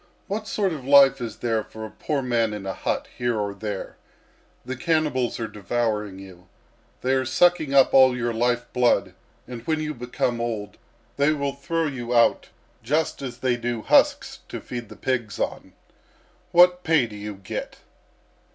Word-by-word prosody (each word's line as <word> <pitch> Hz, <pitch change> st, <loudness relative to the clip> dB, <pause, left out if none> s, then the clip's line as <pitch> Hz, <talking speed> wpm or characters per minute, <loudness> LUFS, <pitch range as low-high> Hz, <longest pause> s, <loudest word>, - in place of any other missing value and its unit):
What 215 Hz, +2 st, -4 dB
sort 195 Hz, -3 st, 0 dB
of 145 Hz, -4 st, -7 dB
life 135 Hz, -1 st, +6 dB
is 115 Hz, -3 st, -4 dB
there 115 Hz, -2 st, -1 dB
for 110 Hz, +1 st, -9 dB
a 110 Hz, -, -9 dB
poor 145 Hz, -3 st, -2 dB
man 115 Hz, -3 st, 0 dB
in 100 Hz, -2 st, -7 dB
a 95 Hz, -, -3 dB
hut -, -, -2 dB
here 120 Hz, -3 st, 0 dB
or 100 Hz, -1 st, -2 dB
there? 100 Hz, -1 st, -6 dB, 0.7 s
The 130 Hz, -, -4 dB
cannibals 145 Hz, -5 st, 0 dB
are 115 Hz, -, -2 dB
devouring 105 Hz, -1 st, -2 dB
you. 90 Hz, -2 st, -13 dB, 0.5 s
They 130 Hz, -, 0 dB
are 130 Hz, 0 st, +2 dB
sucking 155 Hz, +1 st, +2 dB
up 135 Hz, -, +5 dB
all 130 Hz, -2 st, +6 dB
your 120 Hz, -1 st, -1 dB
life 120 Hz, +1 st, 0 dB
blood, 125 Hz, -1 st, +2 dB, 0.3 s
and 120 Hz, -1 st, -7 dB
when 155 Hz, -1 st, +1 dB
you 155 Hz, 0 st, -3 dB
become 120 Hz, -1 st, -2 dB
old, 110 Hz, -3 st, -4 dB, 0.4 s
they 145 Hz, +2 st, +3 dB
will 140 Hz, -2 st, -2 dB
throw 165 Hz, +4 st, -2 dB
you 125 Hz, -4 st, -3 dB
out 115 Hz, -, +3 dB, 0.3 s
just 150 Hz, +8 st, -1 dB
as 125 Hz, -3 st, -6 dB
they 125 Hz, -1 st, +1 dB
do 120 Hz, -2 st, -3 dB
husks -, -, +3 dB
to -, -, -5 dB
feed 120 Hz, -4 st, -7 dB
the -, -, -11 dB
pigs 120 Hz, -6 st, -2 dB
on. -, -, -4 dB, 0.8 s
What 180 Hz, +1 st, +6 dB
pay 160 Hz, -6 st, +3 dB
do 110 Hz, -2 st, -10 dB
you 105 Hz, 0 st, -6 dB
get?" 95 Hz, -1 st, -6 dB
125 Hz, 175 wpm, -24 LUFS, 110-140 Hz, 0.8 s, life